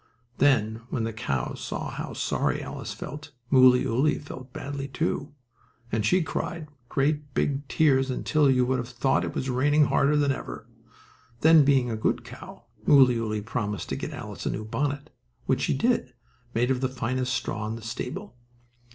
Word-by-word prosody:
Then, 115 -5 +3
when 115 - -1
the 115 0 -2
cow 70 - -2
saw - - -5
how - - -5
sorry - - 0
Alice - - -6
felt, 150 0 -7 0.2
Mooleyooly 130 +1 +5
felt 130 -3 -10
badly, 140 +1 -5
too, 145 +1 -2 0.6
and 110 -1 0
she 180 - +3
cried 165 0 -4 0.2
great 145 0 0
big 140 0 0
tears 135 -4 +3
until 145 +3 +2
you 125 -1 +4
would 130 0 0
have 120 0 -5
thought 125 +2 +1
it - - -4
was 135 - -2
raining 145 +4 +3
harder 145 +2 +3
then 145 -1 +3
ever. 135 - -6 0.7
Then, 160 -1 +7
being 135 -3 +3
a - - -1
good 110 - 0
cow, - - -11 0.2
Mooleyooly 115 -6 +4
promised 105 -3 -3
to - - -1
get - - -4
Alice - - -6
a - - +1
new 110 - -4
bonnet, 140 +6 -2 0.3
which - - +1
she - - +1
did, 180 - +1 0.4
made 120 +3 +2
of 130 -1 0
the 130 - +1
finest 130 0 -1
straw 105 -2 -3
in 110 - -3
the 115 - -9
stable. 125 - -5
130 Hz, 170 wpm, -26 LUFS, 120-145 Hz, 0.7 s, Then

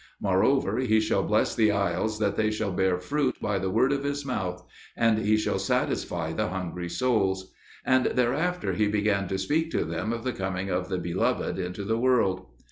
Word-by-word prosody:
Moreover, 105 +4 +2
He 110 -4 +3
shall 110 -2 +1
bless 105 +3 +1
the 110 -2 +3
isles 105 +2 0
that 105 -2 0
they 110 -1 +1
shall 110 -2 -2
bear 95 -1 +1
fruit 135 +7 0
by 100 -2 -1
the 95 0 -2
word 125 +7 +2
of 140 0 -1
His 145 0 -2
mouth; 90 -8 -3 0.3
and 115 -2 +3
He 110 0 +2
shall 110 - 0
satisfy 80 -2 -1
the - - -1
hungry 90 -1 -4
souls." 95 -5 0 0.3
And 130 0 +3
thereafter 150 +9 0
he 105 -1 +1
began 105 -2 +1
to 95 - -2
speak 155 +12 0
to - - +1
them 85 +7 -3
of 115 0 -4
the 130 -1 -1
coming 95 0 -3
of 90 +1 -1
the 95 - -1
Beloved 85 +2 -1
into 90 +2 -4
the 110 +3 0
world. 115 -7 +2
105 Hz, 195 wpm, -27 LUFS, 95-120 Hz, 0.3 s, He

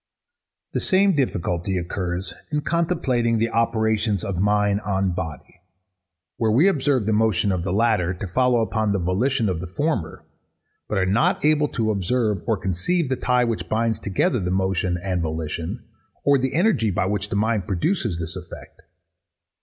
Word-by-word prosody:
The - - 0
same 195 -1 +3
difficulty 90 - -1
occurs 90 +1 -3 0.2
in 150 0 0
contemplating 145 -9 0
the 115 +1 0
operations 110 -3 +1
of 95 -3 -3
mind 105 0 +2
on 95 -2 0
body 85 0 -6 0.8
where 115 -3 +1
we 130 - +4
observe 140 - +1
the 110 - +1
motion 105 -2 +2
of 90 -2 -1
the 90 - -2
latter 105 -4 +2
to 100 - -5
follow 125 +5 +2
upon 110 -2 0
the 100 - 0
volition 105 +7 +1
of 90 -4 -1
the 90 - -5
former, 105 - -2 0.6
but 105 - -1
are 95 - +2
not 105 +9 +1
able 150 -1 +3
to 110 -5 -1
observe 105 0 0
or 110 -3 +2
conceive 115 - -1
the 130 - +1
tie 125 0 +2
which 115 -2 -2
binds 110 0 0
together 105 +4 0
the 90 -2 -2
motion 95 -1 0
and 90 -1 -2
volition, 80 0 -4 0.4
or 140 -1 +4
the 130 +2 -1
energy 175 - +2
by 90 -1 0
which 105 +1 -2
the - - -3
mind 110 -1 0
produces 105 - -1
this 85 0 -5
effect. 90 -1 -10
105 Hz, 170 wpm, -23 LUFS, 90-125 Hz, 0.8 s, we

